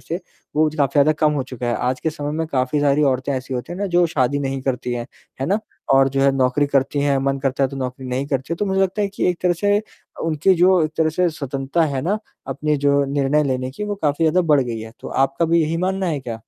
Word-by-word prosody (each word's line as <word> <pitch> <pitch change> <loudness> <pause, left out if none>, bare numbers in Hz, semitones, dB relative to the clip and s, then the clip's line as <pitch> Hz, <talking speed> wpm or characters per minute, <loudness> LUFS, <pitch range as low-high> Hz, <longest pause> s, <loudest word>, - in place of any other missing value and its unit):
से 170 +4 -5 0.4
वो 155 0 +4
ज 155 - -11
काफ़ी 140 -3 +1
ज़्यादा 145 +1 +5
कम 155 -1 +3
हो 145 -3 -1
चुका 125 -2 -6
है। 120 - 0
आज 125 +1 -1
के 160 - -1
समय 145 -2 -5
में 160 +1 -2
काफ़ी 135 0 0
सारी 145 +1 +3
औरतें 135 0 +1
ऐसी 130 0 -4
होती 125 +7 -4
हैं 180 - -6
ना 205 - -1
जो 175 -1 +3
शादी 145 -2 0
नहीं 135 -1 -2
करती 125 -2 -2
हैं, 120 -1 -3 0.3
है 135 - -1
ना? 200 +4 +2 0.3
और 135 0 +5
जो 135 0 -1
है 140 - +5
नौकरी 130 +2 +2
करती 140 0 +1
हैं, 140 -1 +2
मन 135 0 0
करता 135 0 -1
है - - +1
तो 140 - -7
नौकरी 130 0 -5
नहीं 130 +2 -2
करती 140 +2 -2
है, 170 - -1
तो 205 - -1
मुझे 190 0 +1
लगता 195 +2 0
है 200 - 0
कि 195 -2 -1
एक 175 - -5
तरह 180 - +3
से 205 +4 +1 0.4
उनकी 165 +4 +2
जो 180 0 +4
एक 155 - -2
तरह 160 -1 +3
से 180 +2 +1
स्वतंत्रता 140 +1 -2
है 130 - -1
ना, 200 +6 0 0.3
अपने 150 -1 -1
जो 140 0 +2
निर्णय 140 +2 +1
लेने 130 -1 -1
की 210 +10 -5
वो 205 - -2
काफ़ी 150 +2 +1
ज़्यादा 160 +3 +3
बढ़ 145 - +5
गई 120 -3 -3
है। 110 +1 -9
तो - - -7
आपका 135 +4 +1
भी 165 +1 +3
यही 160 +2 -1
मानना 190 +2 -1
है 150 -5 -1
क्या? 115 -3 -6
145 Hz, 275 wpm, -21 LUFS, 135-165 Hz, 0.4 s, ज़्यादा